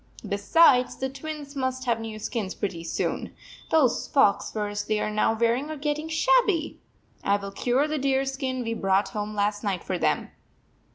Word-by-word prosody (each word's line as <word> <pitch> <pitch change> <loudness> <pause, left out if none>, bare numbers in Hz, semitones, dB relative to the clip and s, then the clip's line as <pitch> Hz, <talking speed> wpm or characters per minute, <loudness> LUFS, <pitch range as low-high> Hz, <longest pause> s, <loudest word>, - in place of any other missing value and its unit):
Be 200 0 -1
sides, 250 +3 +5
the 265 - -3
Twins 290 +1 -7
must 260 -1 -2
have 235 -2 +1
new 225 -1 -6
skins 215 -2 -3
pretty 180 -5 -4
soon. - - -3 0.3
Those 280 -7 +3
fox 240 -8 +3
furs 205 -1 -3
they 215 -1 0
are 215 - -1
now 215 +1 +2
wearing 235 +6 +1
are 310 - -5
getting 300 +2 -2
shabby. 395 -1 +2 0.4
I. 200 0 +3
will 200 -1 -7
cure 250 +8 +1
the 305 -1 -2
deer 270 0 +1
skin 265 -2 -3
we 230 0 -2
brought 195 -2 +1
home 210 0 -4
last 205 +1 0
night 195 -4 -2
for 185 -2 -3
them." - - 0
245 Hz, 180 wpm, -26 LUFS, 205-280 Hz, 0.4 s, sides